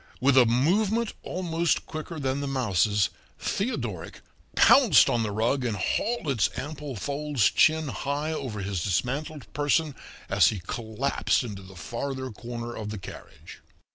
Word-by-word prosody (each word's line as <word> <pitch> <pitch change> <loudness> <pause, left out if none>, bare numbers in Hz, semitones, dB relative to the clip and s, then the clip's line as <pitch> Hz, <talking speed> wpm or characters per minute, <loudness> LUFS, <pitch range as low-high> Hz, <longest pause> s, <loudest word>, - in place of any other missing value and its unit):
With 135 +1 +3
a 125 -3 +7
movement 200 - +2
almost 170 -2 -1
quicker 155 +1 -6
than 135 0 -1
the 140 - -3
mouse's, 105 -6 +1 0.3
Theodoric 120 - -3 0.3
pounced - - +6
on 120 - +1
the 110 - -1
rug 115 +6 0
and 115 -4 -1
hauled 230 - -1
its 130 -6 +2
ample 145 -1 -5
folds 140 0 0
chin 155 0 +3
high 145 +3 -2
over 120 -9 -4
his 95 -3 -2
dismantled 130 - -2
person 145 +1 +1 0.3
as - - +4
he 105 - 0
collapsed 120 +7 -1
into 105 -5 -7
the 95 0 -13
farther 130 +7 -4
corner 120 +1 -6
of 105 -1 -5
the 105 - -5
carriage. 95 - -11
130 Hz, 145 wpm, -27 LUFS, 110-150 Hz, 0.3 s, a